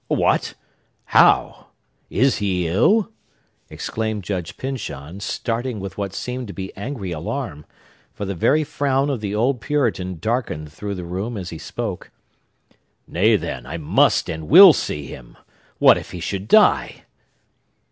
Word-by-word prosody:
"What! - - +1 0.5
How! - - +3 0.4
Is 130 +4 +2
he 90 -4 -1
ill?" 195 - +2 0.6
exclaimed 110 -2 -4
Judge 90 -3 -4
Pyncheon, 95 - -6
starting 115 +3 -3
with 100 0 -7
what 100 -2 -4
seemed 125 -1 -4
to 100 - -7
be 95 0 -7
angry 100 -3 -5
alarm; 75 -2 -5 0.5
for 100 - -6
the 100 - -3
very 145 - +2
frown 140 -1 0
of 125 -6 -3
the 105 -1 -3
old 120 +3 +1
Puritan 115 - -1
darkened 80 - -3
through 100 +5 -5
the 90 -2 -6
room 100 +7 -4
as 90 -3 -6
he 80 - -7
spoke. - - -5 1.0
"Nay, 105 +6 +3
then, 80 -9 -4
I 80 - -5
must 75 -3 +2
and 80 -1 -5
will 180 +3 +10
see 75 - -3
him! 60 -2 -11 0.4
What - - +6
if - - -11
he 90 - -7
should 95 +3 -4
die?" - - +4
100 Hz, 145 wpm, -21 LUFS, 90-125 Hz, 1.0 s, will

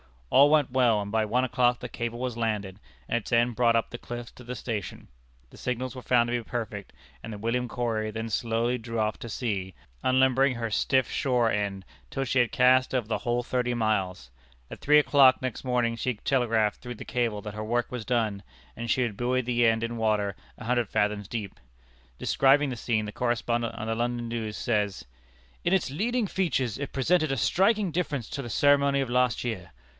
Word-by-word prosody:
All 140 +2 +7
went 150 -4 +3
well, 120 -4 +3
and 100 0 -6
by 110 0 +1
one 125 +4 +1
o'clock 125 -1 +2
the - - -6
cable 120 -1 -4
was 125 -1 -3
landed, 105 -4 -2 0.3
and 120 - +1
its 120 - -7
end 120 0 +3
brought 120 -1 +3
up 115 - +1
the 120 - -6
cliff 120 -1 -7
to 125 - -13
the 125 +1 -5
station. 110 -4 -5 0.4
The - - -14
signals 125 0 -3
were 130 - -8
found 120 -1 +2
to - - -2
be 120 - -1
perfect, 110 -4 -5 0.3
and 115 - -7
the - - -6
William 115 +4 -1
Corry 115 -2 -2
then 115 +1 -4
slowly 115 +2 0
drew 115 0 -6
off 110 -1 0
to 115 - -7
sea, 100 -6 -3 0.3
unlimbering 130 +1 +3
her 115 -1 -3
stiff 130 +4 +1
shore 125 -4 +1
end, 100 -2 -2 0.2
till 135 - -2
she 130 0 +1
had 120 -3 +2
cast 130 +1 +4
over 120 -4 0
the - - 0
whole 120 0 -1
thirty 125 0 -1
miles. 95 - -1 0.4
At - - -8
three 150 +1 +5
o'clock 140 -3 +5
next 130 0 -4
morning 120 -2 +1
she 125 +1 -1
telegraphed 110 -3 +1
through 125 -1 -7
the - - -9
cable 115 -4 -1
that 105 0 -7
her 110 0 -5
work 120 +2 -1
was 125 -3 -5
done, 110 -5 0 0.3
and 120 0 -5
she 130 - +2
had 115 -5 -2
buoyed 125 +1 0
the 120 -1 +3
end 115 0 +2
in 115 0 -3
water 105 -2 0 0.2
a - - -10
hundred 120 0 0
fathoms 105 -1 0
deep. 105 -8 -5 0.6
Describing 140 - +3
the 125 - -4
scene, 115 -2 0
the 105 - -5
correspondent 120 0 -1
of 110 - -5
the 115 0 -1
London 120 0 -2
News 110 -2 -4
says: 105 - -1 0.6
"In 175 - +2
its 185 -7 +1
leading 230 - 0
features 140 - -1
it 140 - -5
presented 155 +2 +2
a - - -2
striking 195 - +2
difference 150 -8 -2
to 140 - -4
the 120 - -7
ceremony 140 +2 +3
of 135 - -3
last 125 -1 +1
year. 95 -9 -4
120 Hz, 210 wpm, -27 LUFS, 110-130 Hz, 0.6 s, All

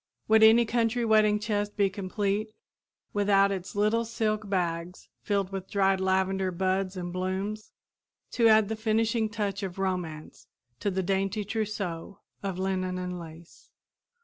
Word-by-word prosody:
Would 220 0 +5
any 225 +2 +7
country 235 +1 0
wedding 215 -1 +4
chest 205 -1 -2
be 200 -1 +4
complete 200 +2 -2 0.6
without 200 -1 +3
its 190 -1 -5
little 215 +3 +2
silk 215 -2 -2
bags 175 -2 -2
filled 200 -2 -1
with 190 -1 -6
dried 195 -2 +2
lavender 190 0 +1
buds 185 +1 -1
and 175 -1 -5
blooms 190 +4 -3 0.6
to 230 -2 +3
add 220 -1 +5
the 220 - -2
finishing 220 0 +1
touch 205 -2 -3
of 190 -2 -5
romance 180 -5 -4 0.3
to 205 - 0
the 190 -1 -1
dainty 195 +2 -1
trousseau 200 -4 -4 0.2
of 195 -2 -3
linen 185 -1 -1
and 180 -1 -4
lace? 165 0 -13
195 Hz, 145 wpm, -28 LUFS, 185-215 Hz, 0.6 s, any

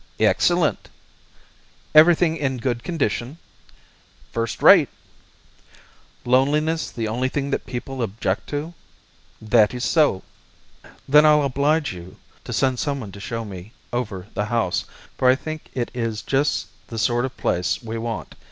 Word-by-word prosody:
"Excellent." - - +2 1.0
"Everything 160 +1 +6
in 135 -4 -2
good 120 -1 -2
condition?" 140 -3 -2 0.9
"First 115 -1 -3
rate." - - +8 1.4
"Loneliness 150 +6 +2
the 115 -2 -4
only 125 +4 -1
thing 140 +1 -3 0.2
people 130 +1 -5
object 105 -3 -2
to?" 150 +3 -4 0.7
"That 110 0 +3
is 125 - -2
so." 150 - +2 0.8
"Then 150 +2 +7
I'll 150 -1 +5
oblige 140 +1 +1
you 90 0 -11 0.3
to - - -6
send 130 -2 +1
someone 140 -9 -3
to 100 - -11
show 115 +2 -4
me 95 +1 -10 0.2
over 105 -7 -3
the 105 - -1
house, 115 -5 -1 0.3
for 130 - +4
I 130 - +6
think 155 +2 -7
it 120 -2 -2
is 115 -4 -3
just 140 +2 0 0.2
the 115 - -7
sort 120 +2 +1
of 130 0 -5
place 90 +7 -1
we 115 0 -4
want. 115 -1 -5
125 Hz, 135 wpm, -22 LUFS, 110-145 Hz, 1.4 s, rate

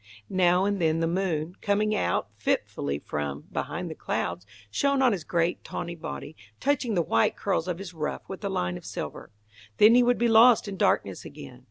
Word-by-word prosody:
Now 180 0 +3
and 200 -2 0
then 160 0 +2
the 165 - +1
moon, 175 -1 -1
coming 210 +1 +1
out 90 - 0
fitfully 70 0 -1
from, 75 -1 -4
behind - - -3
the - - -5
clouds, 90 - -3 0.2
shone 280 - +1
on 260 -2 +4
his 190 -6 -2
great 170 +1 0
tawny 170 -1 -5
body, 160 -2 -7 0.2
touching 255 -5 0
the 170 - +2
white 115 - +2
curls 190 -4 -1
of 180 -2 -2
his 185 -1 -8
ruff 155 -2 -4
with 190 +2 -8
a 200 - -1
line 90 - -1
of - - -12
silver. - - -6 0.5
Then 215 +2 +7
he 250 - +7
would 245 0 +3
be 235 - +2
lost 225 0 +6
in 200 - -4
darkness - - +1
again. - - -11
185 Hz, 195 wpm, -27 LUFS, 160-215 Hz, 0.5 s, Then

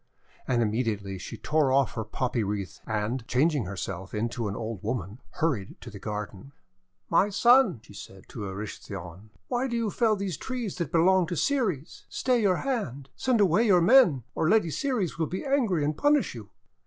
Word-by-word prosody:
And 120 -2 +2
immediately 105 -4 -2
she 90 - -7
tore 150 -3 +1
off 135 -1 +2
her 110 - -3
poppy 120 +2 -2
wreath, 100 -2 -4
and, 110 +3 -2
changing 140 -1 +2
herself 95 +1 -5
into 115 +1 -2
an 100 - -4
old 110 -3 -5
woman, 105 -1 -4
hurried 130 -12 -2
to - - -9
the 100 - -9
garden. 105 +4 -6 0.5
"My 185 +4 +3
Son," 235 - +4
she - - -15
said 95 -1 -11
to 105 - -6
Erysichthon, 95 -1 -8 0.2
"why 250 +2 0
do 235 - -3
you 225 -3 -1
fell 225 0 +2
these 195 -5 -3
trees 245 -8 -4
that 170 -4 -3
belong 180 +1 +4
to 175 - -3
Ceres? 190 - -1
Stay 250 -2 +1
your 190 -4 +3
hand! 140 - -3
Send 250 -4 +1
away 205 +5 +4
your 185 -4 +6
men 175 - +5
or - - -1
the 155 - +3
Lady 170 -7 +1
Ceres 220 - -1
will 160 - +1
be 185 - -5
angry 230 - +1
and 150 +1 -1
punish 290 - +2
you!' 110 -5 -10
145 Hz, 185 wpm, -27 LUFS, -, 0.5 s, your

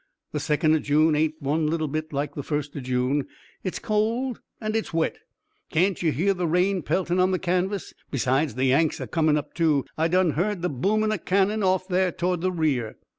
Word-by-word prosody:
The 150 - -2
second 155 +2 +2
o' 160 - +3
June 155 +2 +3
ain't 155 +1 0
one 150 +3 +1
little 160 0 0
bit 155 +2 -4
like 145 0 -2
the 145 - -4
first 145 0 -3
o' - - -3
June. 130 +2 0 0.4
It's 185 - -3
cold 225 +4 -1 0.2
and 215 -1 -3
it's 225 - -1
wet. 165 -1 0 0.5
Can't 180 +3 +1
you 165 -3 +2
hear 180 +10 +1
the 180 -2 -2
rain 180 +3 +2
peltin' 175 +4 0
on 185 +1 +4
the 185 - +1
canvas? 185 +2 -1 0.2
Besides, 135 0 0
the 130 +1 +1
Yanks 145 +4 +2
are - - -3
comin' 155 -2 +2
up, 150 0 -5
too. 155 -5 +2
I 160 - +3
done 180 0 +3
heard 180 +4 -1
the 180 - +1
boomin' 215 - +1
o' 215 - -1
cannon 200 +5 +1
off 185 -1 +1
there 185 -1 +2
toward 180 -1 -1
the 185 +1 +1
rear." 145 -10 -1
165 Hz, 210 wpm, -25 LUFS, 150-185 Hz, 0.5 s, on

